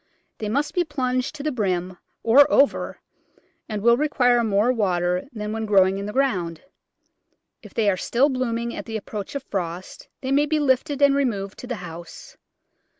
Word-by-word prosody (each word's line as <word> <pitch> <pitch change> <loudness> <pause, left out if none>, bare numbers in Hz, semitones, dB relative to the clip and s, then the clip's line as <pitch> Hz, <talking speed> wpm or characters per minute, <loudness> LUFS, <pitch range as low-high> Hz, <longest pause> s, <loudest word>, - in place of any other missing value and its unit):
They 215 - -3
must 285 +6 -1
be 355 - +2
plunged 255 -4 -2
to 285 - -7
the 305 - 0
brim, 185 -6 -1 0.3
or 270 +5 +6
over, 280 - +2 0.7
and 210 -2 -4
will 235 0 +5
require 245 -5 +2
more 215 +2 +2
water 180 -2 0
than 210 -3 -5
when 220 0 -3
growing 195 -1 +4
in 200 - -4
the - - -4
ground. 185 - -1 1.0
If - - -14
they 220 -2 +1
are 195 -2 +3
still 250 +8 +2
blooming 235 -3 -2
at - - -6
the 225 -1 -4
approach 210 +2 -7
of 280 - -3
frost 180 -4 -5
they 265 - -3
may 290 +2 +3
be 310 0 +1
lifted 285 +1 +1
and 280 -1 +6
removed 210 -8 -1
to 250 - -8
the 245 - -3
house. 170 0 -10
235 Hz, 180 wpm, -23 LUFS, 195-275 Hz, 1.0 s, or